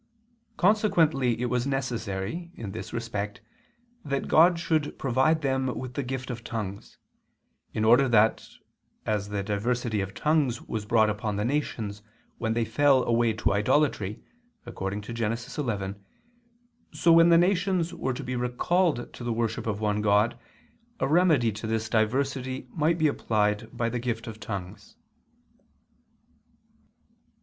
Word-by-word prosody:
Consequently 160 - +3
it 125 - -1
was 125 +1 0
necessary, 125 - -3
in 105 -4 -6
this 110 - -7
respect, 115 -2 -4 0.6
that 140 -1 -2
God 170 +2 +5
should 160 -3 -1
provide 140 +5 +2
them 130 -1 0
with 125 -1 -6
the 140 - -2
gift 130 0 -4
of 115 -1 -7
tongues; 105 -4 -6 0.7
in 110 - -1
order 125 +4 +5
that, 110 -1 +3 0.6
as 105 -2 -1
the 100 -1 -2
diversity 110 +2 -1
of 95 +1 -5
tongues 150 -6 +1
was 105 -2 -5
brought 110 -1 +4
upon 105 0 -3
the 105 +1 -1
nations 115 -7 -2 0.4
when 110 -1 -1
they 115 -1 +1
fell 130 +4 +3
away 115 0 +2
to 105 - 0
idolatry, 105 -1 +1 0.4
according 100 -3 -4
to 105 +3 -8
Gen. 115 -1 -1 0.2
11, 100 -8 -3 0.9
so 170 - +3
when 165 +1 +7
the 170 - +7
nations 180 -1 +1
were 130 -6 -2
to - - -6
be 125 - -3
recalled 125 +4 0
to - - -9
the 120 - -2
worship 115 0 -2
of 105 -1 -2
one 105 -1 0
God 105 +2 +3 0.6
a 135 - +1
remedy 155 -7 +4
to 110 +2 -6
this 110 0 -1
diversity 130 +4 -1
might 165 +1 +1
be 160 - +1
applied 105 -5 0
by 115 - -2
the 120 +1 -2
gift 115 -1 -3
of 110 -1 -8
tongues. 95 -4 -7
120 Hz, 145 wpm, -27 LUFS, 110-140 Hz, 0.9 s, when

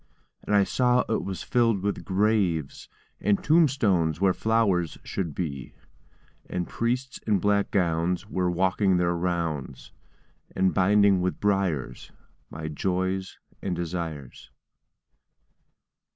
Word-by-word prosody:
And 105 - 0
I 100 - +5
saw 125 +4 +2
it 110 - -1
was 95 -2 -5
filled 115 -6 +1
with 100 0 -2
graves, 95 -7 0 0.3
And 100 -1 +1
tombstones 115 - +2
where 95 -1 +3
flowers 100 -8 +1
should 85 -7 -4
be; 70 -7 -5 0.7
And 90 -1 -3
priests 125 +2 -2
in 105 -2 +3
black 100 +1 +1
gowns 90 0 0
were 90 -4 -1
walking 95 +2 +2
their 85 0 +1
rounds, 85 -6 -3 0.6
And 95 0 +2
binding 100 0 +4
with 90 0 -2
briars 95 -11 -1 0.4
my 80 0 -6
joys 95 +4 -2 0.2
and 95 -2 -2
desires. 80 -6 -5
95 Hz, 115 wpm, -26 LUFS, 85-105 Hz, 0.7 s, I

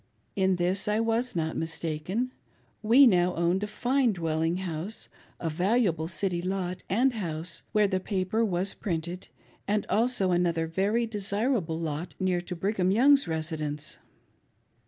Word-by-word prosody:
In 190 -1 +2
this 180 +3 +1
I 210 +1 +1
was 230 +1 0
not 160 -1 -1
mistaken. 165 +9 -3 0.5
We 240 +6 +7
now 180 -5 +3
owned 170 +3 +1
a 210 - -2
fine 245 +2 +1
dwelling 165 -1 -1
house, 185 +3 -4 0.3
a 165 - -3
valuable 175 0 +1
city 175 +1 -1
lot 185 0 -3
and 245 +7 +2
house, 170 -6 -3
where 210 -1 +3
the 190 -1 0
paper 195 +3 -1
was 190 -2 +1
printed, 175 0 -4 0.4
and 210 0 0
also 225 -4 +2
another 170 -2 +1
very 200 +8 0
desirable 205 -4 -1
lot, 165 +1 -4
near 185 -2 +1
to 180 +1 -6
Brigham 190 +1 0
Young's 275 +6 +5
residence. 155 -1 -3
185 Hz, 140 wpm, -28 LUFS, 165-215 Hz, 0.5 s, We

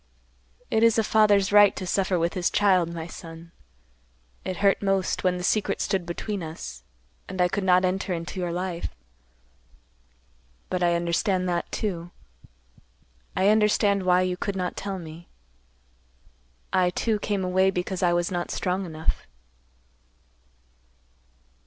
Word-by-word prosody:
It 220 - +2
is 230 -1 +5
a 225 - +3
father's 205 -3 +3
right 205 -1 +6
to 185 - -5
suffer 185 0 0
with 170 0 0
his 180 -1 0
child, 185 -5 +3
my 165 -1 -5
son. 165 0 -11 0.9
It 185 -1 -4
hurt 200 -1 +2
most, 195 -2 0
when 180 -1 +2
the 180 - -5
secret 210 +3 +1
stood 190 -3 -1
between 200 +3 -4
us, 160 - -7 0.5
and 190 0 -6
I 180 - +4
could 195 +3 -2
not 185 0 +4
enter 190 +1 -1
into 175 +2 -4
your 175 -1 -2
life, 175 - -4 1.8
but 180 - -1
I 175 -1 +3
understand 180 +2 0
that, 175 -1 -2
too. 175 -5 -3 1.3
I 190 +1 +3
understand 210 -2 +3
why 180 0 +3
you 180 -1 -1
could 200 +2 -3
not 180 -1 -2
tell 195 -1 -4
me. 165 0 -10 1.4
I, 185 -1 +3
too, 215 +4 -1
came 200 -2 -1
away 190 +1 +3
because 180 0 -3
I 175 -2 +3
was 175 +1 0
not 175 -1 -2
strong 185 +1 -2
enough." 160 -1 -3
185 Hz, 145 wpm, -25 LUFS, 175-195 Hz, 1.8 s, right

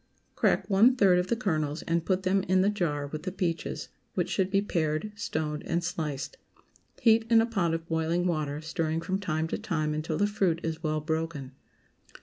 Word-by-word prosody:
✠ - - -43
Crack 190 - +2
one 220 +6 +5
third 190 -7 +5
of 180 - -1
the 235 - +1
kernels 155 -9 -1
and 170 0 0
put 185 -1 +1
them 195 +1 +2
in 185 0 +4
the 200 +2 +3
jar 150 -8 -1
with 150 +2 -6
the 185 +3 -4
peaches, 175 -3 -3 0.3
which - - 0
should 190 -2 +1
be 195 0 +3
pared, 165 0 -1
stoned, 155 -6 -3
and 170 +1 0
sliced. 155 -6 -3 0.6
Heat 225 -1 +5
in 230 -1 +6
a 225 - +4
pot 190 -8 0
of 165 0 -6
boiling 165 +2 0
water, 155 -4 -1
stirring 160 0 -2
from 190 +3 -1
time 160 -5 -1
to - - -2
time 160 -8 -1
until 155 +1 -2
the 205 - +3
fruit 195 -5 +1
is 160 0 -3
well 155 -2 -1
broken. 160 -3 -3
165 Hz, 200 wpm, -28 LUFS, 155-195 Hz, 0.6 s, in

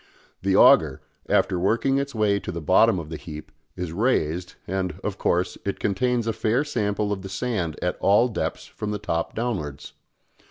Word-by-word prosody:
The - - +1
auger, - - +6 0.3
after 90 - +2
working 115 +8 +2
its 140 -2 -4
way 105 -2 +2
to 90 - -6
the 85 - -4
bottom 85 +3 +4
of 80 -3 -6
the 80 - -4
heap, 75 -3 -9 0.2
is 90 -3 -4
raised, 90 -5 0
and, 95 -1 -3
of - - -3
course, 90 +1 0
it 100 - -3
contains 120 +4 0
a 115 - 0
fair 115 +7 +1
sample 105 -7 -1
of 95 - -5
the 95 - -7
sand 95 -6 -2
at 90 - -1
all 105 +5 +4
depths 115 - -3
from 105 - -6
the 105 - -1
top 85 -5 -3
downwards. 85 - -4
100 Hz, 185 wpm, -24 LUFS, 90-115 Hz, 0.3 s, auger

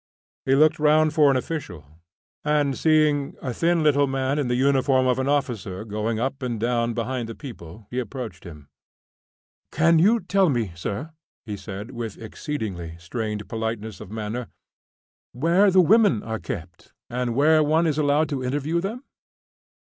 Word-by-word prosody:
He 135 - +3
looked 155 +2 +4
round 155 +1 +4
for 150 -2 +5
an 135 - +3
official, 125 - -5 0.6
and 150 -2 +1
seeing 155 -2 +2
a 125 - -4
thin 170 +3 +1
little 145 -2 +4
man 135 +2 -1
in 140 - 0
the 120 - 0
uniform 130 0 +3
of 130 0 +2
an 130 +1 0
officer 110 -9 -2
going 110 +1 -2
up 135 +3 -2
and 120 -3 -3
down 115 0 0
behind 120 0 -3
the 115 - -6
people, 110 - -10
he 125 - -2
approached 120 -6 -6
him. 75 -6 -11 1.0
"Can 165 +1 +4
you 215 +7 +4
tell 190 -1 +2
me, 115 -8 -1
sir," 100 - -5 0.3
he 105 -2 -4
said, 100 +3 -8
with 115 -4 -6
exceedingly 105 - -5
strained 105 +3 -4
politeness 110 -1 -4
of - - -9
manner, 110 +2 -4 0.9
"where 170 +10 +3
the 185 0 +6
women 205 - +4
are 110 -1 -4
kept, 85 -1 -8
and 120 -1 -2
where 155 +3 +5
one 155 +3 +2
is 155 -2 0
allowed 150 +1 +2
to 135 -3 -3
interview 145 +6 -1
them?" 225 +8 -5
130 Hz, 165 wpm, -24 LUFS, 110-150 Hz, 1.0 s, the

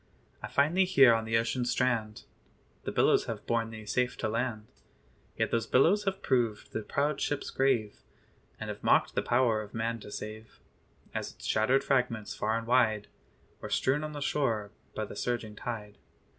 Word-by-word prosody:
I 105 - -5
find 140 +8 +2
thee 190 0 +5
here 135 -10 +6
on 115 0 0
the 115 0 +2
ocean 115 +2 0
strand; 120 -3 0 0.6
The - - -2
billows - - +3
have - - -5
borne 115 -1 0
thee 110 -1 -9
safe 125 +4 0
to 110 - -1
land: 110 -1 -2 0.7
Yet - - 0
those 115 -1 0
billows 190 - +4
have 195 0 -2
proved 120 -5 0
the 110 - -2
proud 145 +7 -1
ship's 145 -1 -2
grave, 125 -6 +1 0.6
And - - -4
have - - -9
mocked - - +3
the - - +1
power 120 -3 +2
of 105 +1 -10
man 115 +1 -1
to 105 - -10
save, 110 +1 -8 0.5
As - - -4
its - - -12
shattered 125 +5 +2
fragments 120 -6 0
far 110 +1 0
and 115 - -4
wide 115 -4 +2 0.5
Were - - -7
strewn 135 +3 +1
on 155 0 -5
the 145 - -6
shore 115 -9 0 0.2
by 110 - -2
the - - -9
surging 115 -3 -3
tide. 105 -4 -6
115 Hz, 185 wpm, -30 LUFS, 110-130 Hz, 0.7 s, here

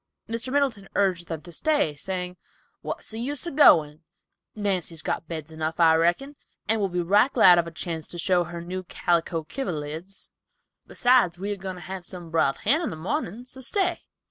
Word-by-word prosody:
Mr. 230 +3 -4
Middleton 260 -9 0
urged 185 -4 +1
them 165 -3 -5
to 175 - -11
stay, 290 - +1
saying, 180 +3 -4 0.5
"What's - - -5
the 220 - -5
use 275 +5 -2
of 340 - -4
goin'? 155 - +6 0.5
Nancy's 185 -6 -2
got 165 - -2
beds 160 -2 -6
enough, 160 +1 -4
I 165 -1 +6
reckon, 175 - +1 0.3
and 220 0 +2
will 195 - +1
be 175 0 -1
right 205 +9 +4
glad 180 -9 +7
of 170 - 0
a - - -7
chance 160 -1 -5
to 175 - -8
show 175 0 +2
her 170 0 -7
new 185 +2 -5
calico 170 -2 0
kiverlids, 165 - -5
and - - -50
besides 245 -9 +3
we 200 +3 -3
are - - -4
goin' 190 -1 -6
to 180 - -10
have 190 0 -6
some 175 -2 -8
briled 140 -4 +2
hen 285 +10 +3
in 335 - -1
the - - -5
morning, 180 +7 -3
so 260 +1 -10
stay." 360 - 0
180 Hz, 195 wpm, -25 LUFS, 165-225 Hz, 0.5 s, glad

